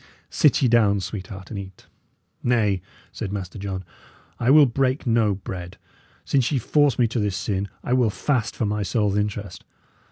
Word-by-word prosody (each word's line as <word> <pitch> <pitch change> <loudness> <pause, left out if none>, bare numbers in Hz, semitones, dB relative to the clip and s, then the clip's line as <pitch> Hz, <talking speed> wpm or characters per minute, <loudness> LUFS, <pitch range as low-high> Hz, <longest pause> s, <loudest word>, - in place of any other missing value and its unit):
Sit 150 -2 +3
ye - - +5
down, 110 -4 +4
sweetheart, 95 0 -7
and 105 - -4
eat." 95 -1 -10 0.6
"Nay," 105 -6 +1 0.3
said 95 - -5
Master 100 -1 -5
John, 95 -1 -4 0.6
"I 120 - +1
will 150 +1 +8
break 130 +2 0
no 115 -4 +2
bread. 90 -2 -7 0.5
Since 135 -2 +1
ye 145 - +2
force 145 +3 +2
me 120 - +3
to 115 - -2
this 105 -3 -1
sin, 100 -1 -2 0.2
I 125 - -1
will 125 -3 +3
fast 115 +1 -1
for 115 - -1
my 105 0 -1
soul's 100 +1 0
interest. 105 -2 -3
105 Hz, 170 wpm, -23 LUFS, 100-125 Hz, 0.6 s, will